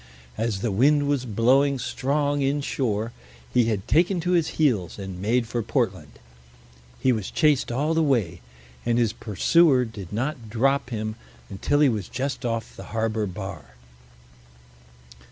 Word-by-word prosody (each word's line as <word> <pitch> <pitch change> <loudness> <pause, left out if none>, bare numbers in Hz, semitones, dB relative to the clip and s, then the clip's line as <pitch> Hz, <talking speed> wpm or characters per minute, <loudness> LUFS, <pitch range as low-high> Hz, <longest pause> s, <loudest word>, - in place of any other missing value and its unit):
As 110 -3 -2
the 115 - 0
wind 145 +8 +3
was 140 -3 0
blowing 130 +6 +3
strong 140 +4 -1
inshore, 130 -6 -1 0.4
he 120 - +4
had 105 -4 -2
taken 175 +3 +3
to 175 +2 -1
his 170 -3 +3
heels 115 - +1
and 95 -2 -7
made 115 +4 +1
for 120 +1 -2
Portland. 100 - -2 0.9
He 130 - +3
was 110 -5 -2
chased 150 -5 +2
all 145 +6 0
the 165 - +2
way, 115 - 0 0.4
and 120 0 +1
his 115 -2 +2
pursuer 130 - +3
did 105 -6 -9
not 120 +1 -3
drop 135 +4 +1
him 110 -2 -4 0.3
until 145 +9 0
he 150 - +6
was 105 -6 -3
just 135 +1 -3
off 115 -1 -3
the - - -9
harbor 110 -1 0
bar. 90 - -8
120 Hz, 150 wpm, -24 LUFS, 105-140 Hz, 0.9 s, he